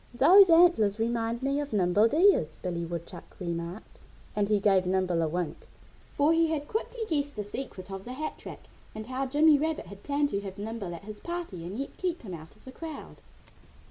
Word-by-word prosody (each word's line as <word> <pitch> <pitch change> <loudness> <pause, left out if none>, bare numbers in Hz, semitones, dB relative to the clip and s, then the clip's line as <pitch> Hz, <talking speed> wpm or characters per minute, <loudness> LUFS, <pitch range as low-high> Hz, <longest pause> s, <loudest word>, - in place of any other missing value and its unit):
"Those 380 +9 +7
antlers 330 - +5
remind 230 +1 -1
me 275 +1 +1
of 290 -3 -4
Nimble 205 +2 +4
Deer's," 305 - +3
Billy 175 -2 -2
Woodchuck 170 +1 -8
remarked. 170 +2 -6 0.3
And 205 -1 0
he 210 -1 +3
gave 195 -2 +3
Nimble 185 -2 +1
a 160 - +1
wink, 175 +1 -4 0.4
for 290 +3 +3
he 330 0 +3
had 300 -2 -2
quickly 460 +2 -4
guessed 290 -4 -1
the 210 - -3
secret 205 -3 -7
of 195 0 -6
the 250 - -6
hat 310 +4 -5
rack - - -9 0.3
and 215 0 -6
how 260 +2 -3
Jimmy 295 +2 +5
Rabbit 315 +1 -2
had 195 +2 -12
planned 285 +2 0
to 200 - -2
have 195 -2 -8
Nimble 205 -4 -5
at 170 - -11
his 210 0 -8
party 340 - -5
and 195 +4 -6
yet 275 - -5
keep 355 -5 -3
him 190 -5 -7
out 160 +2 -10
of 215 - -22
the 260 - -9
crowd. 315 +2 -8
225 Hz, 205 wpm, -28 LUFS, 185-290 Hz, 0.4 s, Those